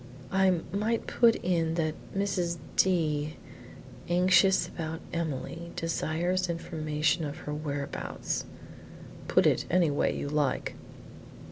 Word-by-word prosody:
"I 190 Hz, -3 st, +3 dB
might 215 Hz, +3 st, 0 dB
put 235 Hz, -1 st, +4 dB
it 165 Hz, -2 st, +1 dB
that 155 Hz, -2 st, 0 dB, 0.2 s
Mrs. 180 Hz, -4 st, 0 dB, 0.2 s
D, 155 Hz, -5 st, +2 dB, 0.7 s
anxious 185 Hz, +2 st, +4 dB
about 160 Hz, -1 st, -5 dB
Emily, 170 Hz, +1 st, -4 dB
desires 175 Hz, +2 st, 0 dB
information 160 Hz, -1 st, 0 dB
of 145 Hz, -1 st, -4 dB
her 150 Hz, -, -3 dB
whereabouts 145 Hz, -2 st, -3 dB, 0.4 s
" -, -, -15 dB
"Put -, -, +4 dB
it -, -, +3 dB
any 170 Hz, -3 st, +3 dB
way 145 Hz, -, +1 dB
you -, -, -3 dB
like." 145 Hz, -1 st, 0 dB
165 Hz, 115 wpm, -29 LUFS, 155-185 Hz, 0.7 s, put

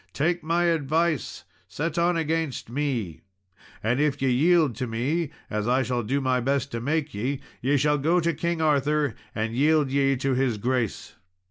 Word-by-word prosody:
Take 170 Hz, +4 st, 0 dB
my 170 Hz, +2 st, +1 dB
advice, 165 Hz, -1 st, 0 dB, 0.2 s
set 165 Hz, +4 st, -3 dB
on 170 Hz, 0 st, +2 dB
against 160 Hz, -6 st, -2 dB
me, 120 Hz, -, -2 dB, 0.6 s
and 120 Hz, +4 st, +1 dB
if 150 Hz, -2 st, +1 dB
ye 135 Hz, -1 st, +1 dB
yield 155 Hz, 0 st, +3 dB
to 130 Hz, -1 st, -2 dB
me, 135 Hz, +8 st, -1 dB, 0.2 s
as 105 Hz, +1 st, -2 dB
I 130 Hz, +2 st, +3 dB
shall 125 Hz, -1 st, -1 dB
do 130 Hz, +6 st, -1 dB
my 130 Hz, -2 st, +1 dB
best 140 Hz, +2 st, -1 dB
to 115 Hz, -, -4 dB
make 150 Hz, +3 st, -1 dB
ye, 130 Hz, +7 st, -2 dB, 0.2 s
ye 140 Hz, +4 st, +2 dB
shall 150 Hz, +2 st, +2 dB
go 165 Hz, +6 st, +2 dB
to 170 Hz, 0 st, +1 dB
King 170 Hz, +1 st, -1 dB
Arthur 150 Hz, -2 st, +2 dB, 0.2 s
and 110 Hz, +1 st, -2 dB
yield 150 Hz, +2 st, +3 dB
ye 135 Hz, 0 st, +2 dB
to 135 Hz, +1 st, -1 dB
his 130 Hz, -3 st, +1 dB
grace." 120 Hz, 0 st, -2 dB
140 Hz, 175 wpm, -25 LUFS, 125-160 Hz, 0.6 s, yield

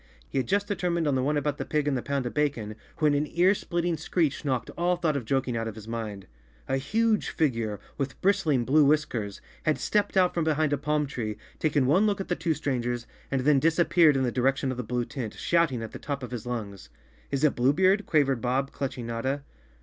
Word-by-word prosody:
He 135 Hz, -, -1 dB
had 125 Hz, -, -2 dB
just 205 Hz, 0 st, +1 dB
de¬ 205 Hz, -, -1 dB
termined 170 Hz, -3 st, 0 dB
on 145 Hz, -, +2 dB
the 130 Hz, -, +1 dB
one 145 Hz, +3 st, +1 dB
about 145 Hz, 0 st, -1 dB
the -, -, -1 dB
pig 150 Hz, -1 st, -1 dB
and 145 Hz, -, +1 dB
the 125 Hz, -, -1 dB
pound 140 Hz, -1 st, -2 dB
of 120 Hz, -, -3 dB
bacon, 135 Hz, -8 st, -1 dB, 0.2 s
when 155 Hz, -3 st, +3 dB
an 145 Hz, +1 st, +1 dB
ear 180 Hz, +3 st, +4 dB
splitting 175 Hz, -3 st, -2 dB
screech 155 Hz, -2 st, 0 dB
knocked 130 Hz, -4 st, -1 dB
all 175 Hz, +1 st, +1 dB
thought 165 Hz, -4 st, 0 dB
of 135 Hz, -5 st, -2 dB
joking 130 Hz, 0 st, 0 dB
out 115 Hz, 0 st, -2 dB
of 110 Hz, -, -6 dB
his 110 Hz, -1 st, -10 dB
mind. 110 Hz, -4 st, -5 dB, 0.4 s
A 135 Hz, -, +1 dB
huge 220 Hz, +10 st, +1 dB
figure, 115 Hz, -9 st, -1 dB, 0.2 s
with 135 Hz, -1 st, -3 dB
bristling 165 Hz, -11 st, +2 dB
blue 150 Hz, +4 st, +5 dB
whiskers, 140 Hz, -9 st, 0 dB, 0.2 s
had 155 Hz, -, +1 dB
stepped 205 Hz, -2 st, 0 dB
out 180 Hz, -1 st, +4 dB
from 170 Hz, -, 0 dB
behind 155 Hz, -1 st, +1 dB
a -, -, +2 dB
palm 150 Hz, +1 st, 0 dB
tree, 115 Hz, -7 st, -4 dB, 0.2 s
taken 150 Hz, -4 st, +2 dB
one 185 Hz, +11 st, +4 dB
look 200 Hz, -2 st, 0 dB
at 195 Hz, -, -5 dB
the 175 Hz, -, +1 dB
two 160 Hz, -2 st, -1 dB
strangers 120 Hz, -5 st, -2 dB, 0.2 s
and 135 Hz, -2 st, 0 dB
then 145 Hz, +1 st, +4 dB
disappeared 165 Hz, -1 st, +4 dB
in 130 Hz, -, +1 dB
the 125 Hz, -, 0 dB
direction 130 Hz, +1 st, +1 dB
of 130 Hz, -, -5 dB
the 125 Hz, -, -3 dB
blue 120 Hz, +1 st, -2 dB
tent, 120 Hz, -6 st, -6 dB
shouting 165 Hz, -9 st, +1 dB
at 110 Hz, -, -6 dB
the -, -, -8 dB
top 140 Hz, -2 st, -4 dB
of 125 Hz, -, -6 dB
his 120 Hz, -1 st, -5 dB
lungs. 100 Hz, -, -5 dB, 0.4 s
"Is 140 Hz, +1 st, -2 dB
it 150 Hz, -, +4 dB
Blue 125 Hz, +3 st, +3 dB
Beard?" 190 Hz, +6 st, +3 dB
quavered 135 Hz, -6 st, +2 dB
Bob, 130 Hz, +2 st, 0 dB
clutching 130 Hz, -3 st, -4 dB
Notta. 130 Hz, +5 st, -2 dB
140 Hz, 235 wpm, -27 LUFS, 125-160 Hz, 0.4 s, blue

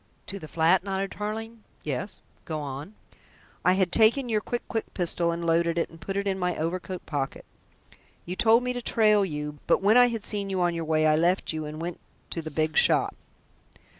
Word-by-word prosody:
"To 200 Hz, -, -6 dB
the 155 Hz, -, -9 dB
flat?" 170 Hz, +4 st, +3 dB
nodded 195 Hz, 0 st, -2 dB
Tarling. 220 Hz, +2 st, -5 dB, 0.2 s
"Yes, 150 Hz, +7 st, -4 dB, 0.2 s
go 155 Hz, -2 st, -3 dB
on." 145 Hz, +7 st, -6 dB, 0.7 s
"I 180 Hz, -, +5 dB
had 185 Hz, -2 st, +1 dB
taken 235 Hz, +5 st, +4 dB
your 215 Hz, -2 st, +1 dB
quick 240 Hz, +2 st, -4 dB
quick 225 Hz, -, -3 dB
pistol 170 Hz, -1 st, +1 dB
and 170 Hz, 0 st, -4 dB
had -, -, -2 dB
loaded 170 Hz, 0 st, +2 dB
it 170 Hz, -, -1 dB
and 165 Hz, -, -15 dB
put 195 Hz, 0 st, -4 dB
it 200 Hz, -, -1 dB
in 190 Hz, -1 st, -1 dB
my 180 Hz, -1 st, -1 dB
overcoat 175 Hz, +3 st, -4 dB
pocket. 140 Hz, -3 st, -4 dB, 0.8 s
You 180 Hz, -, -4 dB
told 230 Hz, +4 st, +4 dB
me 250 Hz, 0 st, -1 dB
to 245 Hz, -, -4 dB
trail 215 Hz, -3 st, +4 dB
you, 150 Hz, -4 st, -4 dB
but -, -, +3 dB
when 215 Hz, +4 st, +5 dB
I 245 Hz, 0 st, +7 dB
had 230 Hz, -3 st, -4 dB
seen 200 Hz, -2 st, -1 dB
you 190 Hz, -1 st, -1 dB
on 175 Hz, -1 st, +2 dB
your 165 Hz, -1 st, -3 dB
way 155 Hz, 0 st, +2 dB
I 155 Hz, 0 st, +5 dB
left 175 Hz, +2 st, +1 dB
you 155 Hz, -1 st, -4 dB
and 150 Hz, +1 st, -7 dB
went 170 Hz, +1 st, -5 dB, 0.3 s
to 165 Hz, -, -2 dB
the 160 Hz, -, -6 dB
big 155 Hz, 0 st, -1 dB
shop." -, -, +3 dB
180 Hz, 215 wpm, -26 LUFS, 160-210 Hz, 0.8 s, I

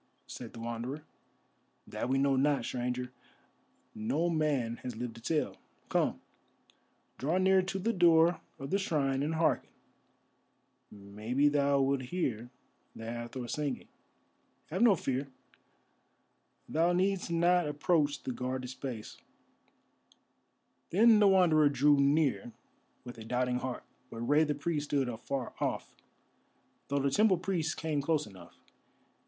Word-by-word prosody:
said -, -, -9 dB
the -, -, -11 dB
Wanderer. 120 Hz, +5 st, -5 dB, 0.8 s
"That -, -, -4 dB
we 135 Hz, -, +2 dB
know 135 Hz, 0 st, +2 dB
not, 140 Hz, +2 st, +2 dB
Stranger; 125 Hz, 0 st, -3 dB, 0.8 s
no 150 Hz, +11 st, -1 dB
man 140 Hz, -8 st, 0 dB
has 125 Hz, -1 st, -7 dB
lived 120 Hz, 0 st, -5 dB
to -, -, -12 dB
tell. 155 Hz, +5 st, -1 dB, 0.3 s
Come, -, -, +1 dB, 1.0 s
draw 155 Hz, +7 st, 0 dB
near 190 Hz, 0 st, +4 dB
to 190 Hz, +1 st, -3 dB
the 225 Hz, +5 st, 0 dB
door 170 Hz, -2 st, +4 dB, 0.2 s
of 135 Hz, +1 st, -7 dB
the 195 Hz, -, +2 dB
shrine 140 Hz, -7 st, 0 dB
and 155 Hz, +3 st, -1 dB
hearken, 160 Hz, 0 st, +1 dB, 1.2 s
maybe 105 Hz, +8 st, -1 dB
thou 140 Hz, -1 st, +2 dB
wilt 135 Hz, 0 st, +1 dB
hear 125 Hz, -5 st, -3 dB, 0.5 s
the 115 Hz, -, -8 dB
Hathor 120 Hz, +2 st, -5 dB
singing. 145 Hz, -1 st, -3 dB, 0.8 s
Have 185 Hz, -, -2 dB
no 235 Hz, -5 st, +6 dB
fear; 135 Hz, -3 st, -2 dB, 1.4 s
thou 170 Hz, +3 st, +2 dB
needst 190 Hz, +1 st, 0 dB
not 170 Hz, 0 st, +3 dB
approach 150 Hz, 0 st, 0 dB
the -, -, -3 dB
guarded 125 Hz, +1 st, -4 dB
space." 125 Hz, -5 st, -7 dB, 1.7 s
Then 220 Hz, +4 st, +6 dB
the 205 Hz, -, +6 dB
Wanderer 170 Hz, -6 st, +5 dB
drew 145 Hz, +1 st, +4 dB
near 140 Hz, -4 st, +2 dB, 0.5 s
with 120 Hz, -2 st, -10 dB
a -, -, -8 dB
doubting 125 Hz, +2 st, -1 dB
heart, 130 Hz, -1 st, -5 dB, 0.3 s
but 115 Hz, -, -7 dB
Rei 145 Hz, +6 st, +3 dB
the 150 Hz, -1 st, -1 dB
Priest 150 Hz, 0 st, -2 dB
stood 140 Hz, -3 st, 0 dB
afar 120 Hz, +3 st, -4 dB
off, -, -, -2 dB, 0.9 s
though 140 Hz, -, -1 dB
the 140 Hz, 0 st, +1 dB
temple 205 Hz, +3 st, +4 dB
priests 170 Hz, -3 st, -2 dB
came 155 Hz, -3 st, -2 dB
close 150 Hz, +1 st, 0 dB
enough. 95 Hz, -4 st, -14 dB
140 Hz, 135 wpm, -31 LUFS, 125-165 Hz, 1.7 s, no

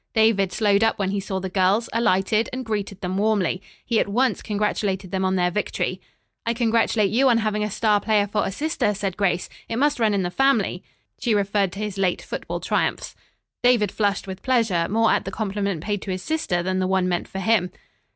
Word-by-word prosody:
David 220 Hz, -4 st, +3 dB
slowed 205 Hz, -1 st, +2 dB
up 225 Hz, -, +2 dB
when 195 Hz, -1 st, -1 dB
he 200 Hz, -, -1 dB
saw 190 Hz, -1 st, -3 dB
the 190 Hz, -, -4 dB
girls, 190 Hz, +4 st, +2 dB
alighted 215 Hz, -1 st, +2 dB
and 255 Hz, 0 st, -5 dB
greeted 205 Hz, -3 st, -3 dB
them 185 Hz, 0 st, -2 dB
warmly. 200 Hz, -4 st, +1 dB, 0.2 s
He 230 Hz, -2 st, +1 dB
at -, -, +1 dB
once 245 Hz, +6 st, +1 dB
congratulated 205 Hz, -3 st, -2 dB
them 190 Hz, 0 st, -1 dB
on 190 Hz, 0 st, +1 dB
their 180 Hz, -1 st, +1 dB
victory. 210 Hz, +3 st, -2 dB, 0.4 s
"I 230 Hz, +1 st, -1 dB
congratulate 225 Hz, -3 st, +2 dB
you 260 Hz, +4 st, +4 dB
on 235 Hz, -, +4 dB
having 215 Hz, -1 st, 0 dB
a 210 Hz, -, -1 dB
star 210 Hz, 0 st, +2 dB
player 210 Hz, -1 st, +2 dB
for 205 Hz, +1 st, -1 dB
a -, -, -2 dB
sister," 210 Hz, -3 st, -1 dB
said 195 Hz, -2 st, -3 dB
Grace. 190 Hz, -3 st, 0 dB, 0.2 s
"It 225 Hz, -, -2 dB
must 290 Hz, +2 st, +1 dB
run 215 Hz, -3 st, +2 dB
in 195 Hz, -, 0 dB
the 175 Hz, -, -2 dB
family." 230 Hz, -7 st, +1 dB, 0.4 s
She 230 Hz, -3 st, +1 dB
referred 200 Hz, -1 st, +1 dB
to 195 Hz, -, -7 dB
his 210 Hz, -2 st, -4 dB
late 185 Hz, -2 st, 0 dB
football -, -, -5 dB
triumphs. -, -, -1 dB, 0.5 s
David 235 Hz, -6 st, +3 dB
flushed 200 Hz, -2 st, 0 dB
with 190 Hz, 0 st, -7 dB
pleasure, 220 Hz, -10 st, +1 dB
more 225 Hz, +2 st, +3 dB
at -, -, +1 dB
the -, -, -5 dB
compliment 200 Hz, -4 st, -2 dB
paid 205 Hz, -1 st, -2 dB
to -, -, -7 dB
his 185 Hz, 0 st, -3 dB
sister 250 Hz, -, -1 dB
than 185 Hz, +1 st, -1 dB
the 185 Hz, -, 0 dB
one 190 Hz, -1 st, +1 dB
meant 175 Hz, -1 st, -1 dB
for -, -, -8 dB
him. 190 Hz, -2 st, +2 dB
205 Hz, 215 wpm, -23 LUFS, 190-225 Hz, 0.5 s, you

